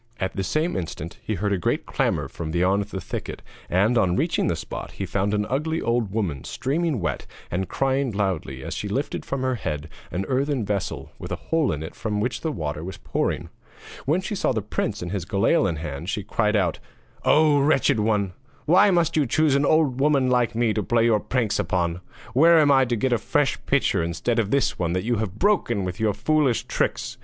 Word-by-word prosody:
At 95 - -2
the 95 - -1
same 155 - 0
instant 85 -2 -5
he 110 - -2
heard 100 +2 0
a 95 - 0
great - - 0
clamour - - 0
from 80 -1 -6
beyond 90 +4 +2
the 100 -2 -6
thicket, 85 - -6 0.3
and, 110 +7 +3
on 90 -3 +2
reaching 165 - +1
the 85 - +1
spot, - - -7
he - - -4
found 100 +1 0
an 105 0 0
ugly 160 +5 -1
old 115 -4 0
woman 95 - -2
streaming 145 +2 -1
wet 85 - -3 0.2
and 95 +2 -2
crying 135 0 +1
loudly 90 -10 -2
as - - -4
she 105 - -4
lifted 130 +8 -2
from 135 -1 -3
her 130 0 +1
head 80 -9 -4 0.2
an 95 +2 -3
earthen 135 -2 0
vessel 100 -2 -3
with - - -7
a - - 0
hole 160 -8 0
in 75 -1 -3
it 80 - -7
from 105 -2 -3
which 120 +4 -2
the 160 - -1
water 75 - -4
was 95 +2 -6
pouring. - - -2 0.6
When 160 +6 +2
she 190 - -4
saw 195 - +1
the 110 -3 -2
prince 105 0 -2
with 85 - -5
his 100 -3 -2
galail 100 - +2
in 85 - -2
his 80 - -7
hand, 75 +4 -5
she 105 0 -2
called 105 +2 +1
out: 90 -5 +1 0.4
'Oh, 150 -1 +5
wretched 140 -5 +3
one! 105 -3 +1 0.3
why 190 +6 +6
must 170 -4 +2
you 150 -4 +2
choose 155 +3 +3
an 140 +1 +3
old 150 -5 +3
woman 135 -3 +3
like 125 -2 +2
me 115 -2 +2
to 105 - 0
play 115 +3 +2
your 110 -2 +4
pranks 120 -1 -1
upon? 85 0 -1 0.3
Where 165 +6 +6
am 145 -2 +5
I 135 -1 +5
to 120 -1 0
get 125 +3 +1
a 120 - +2
fresh - - 0
pitcher - - +2
instead 85 +8 -1
of 105 -3 0
this 140 +2 +1
one 85 -1 0
that 90 - -1
you 120 +1 0
have 105 -2 -3
broken 195 - +2
with 90 0 -4
your 110 -2 +1
foolish 150 -6 +2
tricks? - - -2
110 Hz, 220 wpm, -24 LUFS, 95-140 Hz, 0.6 s, why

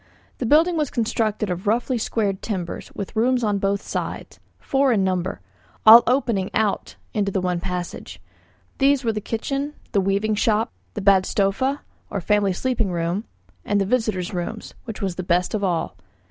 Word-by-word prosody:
The 245 - -1
building 330 +6 +4
was 300 -4 0
constructed 220 -3 -1
of 180 +4 -4
roughly 240 +3 +1
squared 205 -4 -1
timbers, 185 -6 -4
with 200 - -6
rooms 245 +2 +2
on 205 -2 +1
both 200 +1 0
sides, - - -5 0.2
four 275 -1 +1
in 205 -5 +2
number, 185 - -1 0.4
all 225 +2 +11
opening 235 -7 +1
out 215 -2 0 0.2
into 200 -2 0
the 195 - 0
one 180 -1 -1
passage: 180 0 -5 0.6
these 275 0 +3
were 225 -2 +1
the 210 - -3
kitchen, 275 +7 -3 0.2
the 200 - +2
weaving 200 +3 +1
shop, 215 +1 +1 0.2
the 210 - -3
badstofa, 200 +7 +2 0.3
or 200 - -2
family 205 +1 +2
sleeping 225 0 -1
room, 175 +5 -1 0.4
and 205 -1 +1
the 195 - +1
visitors' 215 -5 0
room, 180 +5 -3 0.3
which 225 -2 -6
was 190 -3 -2
the 185 - -3
best 175 +1 +1
of 210 -2 -1
all. 175 - -1
210 Hz, 170 wpm, -23 LUFS, 190-235 Hz, 0.6 s, all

